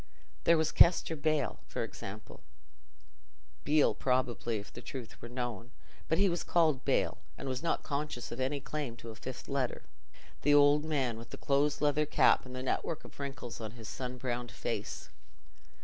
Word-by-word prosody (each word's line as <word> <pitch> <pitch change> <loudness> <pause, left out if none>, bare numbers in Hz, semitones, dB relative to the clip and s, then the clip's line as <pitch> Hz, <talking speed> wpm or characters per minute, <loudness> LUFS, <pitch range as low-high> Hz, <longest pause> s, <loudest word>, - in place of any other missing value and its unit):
There 170 - +6
was 160 -1 +2
Kester 170 -1 +5
Bale, 155 0 0
for - - -2
example - - -8 1.2
(Beale, 150 0 +4
probably, 125 -3 0
if 100 - -8
the 120 - -8
truth 125 -2 -8
were 120 - -7
known, 120 -2 -4 0.4
but 160 - +3
he 200 - +5
was 175 -2 0
called 155 -6 +3
Bale, - - +1 0.2
and - - -6
was 130 0 -2
not 170 - 0
conscious 145 -4 -3
of 120 - -5
any 135 +2 0
claim 140 -3 -4
to 115 -1 -9
a - - -10
fifth 130 +2 -7
letter), 135 -3 -1 0.6
the 145 +1 +5
old 145 +1 +6
man 130 -7 0
with 115 - -10
the - - -8
close 140 +1 +1
leather 150 0 +3
cap 145 - +4
and 125 - -8
the 130 - -4
network 155 +4 -1
of - - -14
wrinkles 135 -4 -5
on 110 -1 -5
his 115 -3 -9
sun 125 -1 -5
browned 120 -1 -3
face. - - -4
135 Hz, 180 wpm, -32 LUFS, 120-150 Hz, 1.2 s, There